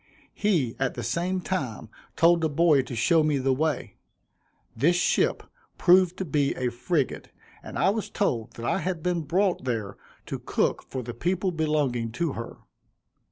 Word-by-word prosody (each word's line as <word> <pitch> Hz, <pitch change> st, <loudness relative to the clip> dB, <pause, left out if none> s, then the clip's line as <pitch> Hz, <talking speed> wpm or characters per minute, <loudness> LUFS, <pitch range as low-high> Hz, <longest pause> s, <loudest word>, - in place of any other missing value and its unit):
He 165 Hz, -, +1 dB
at 135 Hz, -1 st, -1 dB
the 120 Hz, -, -4 dB
same 175 Hz, -, -1 dB
time 130 Hz, -, -3 dB, 0.3 s
told 170 Hz, 0 st, +4 dB
a 160 Hz, -, +2 dB
boy 150 Hz, -1 st, +4 dB
to 125 Hz, -1 st, -7 dB
show 160 Hz, +8 st, +3 dB
me 150 Hz, -2 st, +2 dB
the 135 Hz, 0 st, +1 dB
way. 155 Hz, +3 st, -2 dB, 0.8 s
This 170 Hz, +5 st, +3 dB
ship 175 Hz, -, +1 dB, 0.3 s
proved 185 Hz, 0 st, +4 dB
to 190 Hz, -, -3 dB
be 145 Hz, -3 st, +1 dB
a 125 Hz, -1 st, -1 dB
frigate, 135 Hz, +4 st, -2 dB, 0.3 s
and -, -, -8 dB
I 190 Hz, -, +3 dB
was 220 Hz, 0 st, -3 dB
told 115 Hz, -, -1 dB
that 115 Hz, -, -7 dB
I 155 Hz, -, +1 dB
had 175 Hz, -2 st, -3 dB
been 180 Hz, -2 st, 0 dB
brought 180 Hz, +4 st, 0 dB
there 115 Hz, -6 st, -3 dB, 0.3 s
to -, -, -5 dB
cook -, -, 0 dB
for 130 Hz, -1 st, -4 dB
the 120 Hz, +1 st, -6 dB
people 180 Hz, -, -1 dB
belonging 150 Hz, -8 st, 0 dB
to 165 Hz, 0 st, -1 dB
her. 115 Hz, +1 st, -7 dB
155 Hz, 170 wpm, -26 LUFS, 125-175 Hz, 0.8 s, told